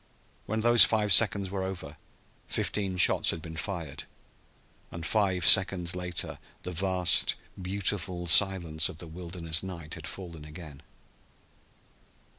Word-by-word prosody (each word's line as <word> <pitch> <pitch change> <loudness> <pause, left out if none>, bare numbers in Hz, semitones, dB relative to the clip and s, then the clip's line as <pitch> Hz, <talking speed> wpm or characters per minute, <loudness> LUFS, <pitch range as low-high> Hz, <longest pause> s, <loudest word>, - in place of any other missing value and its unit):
When 110 +1 -3
those 120 -2 +8
five 105 -3 +1
seconds 100 -2 +3
were 100 -1 -4
over 90 -6 -8 0.5
fifteen 95 -3 -3
shots 90 - +3
had - - -1
been 80 0 -10
fired, 80 -4 -7 0.8
and 85 0 -8
five 95 -4 -1
seconds 95 -3 +4
later 90 0 -4 0.2
the 90 - -6
vast, 90 0 +2 0.3
beautiful 95 -2 -3
silence 85 -3 +3
of - - -11
the 85 - -10
wilderness 85 -1 -4
night 85 -5 -9
had - - -8
fallen 85 -5 -9
again. 75 -2 -12
90 Hz, 125 wpm, -27 LUFS, 85-95 Hz, 0.8 s, those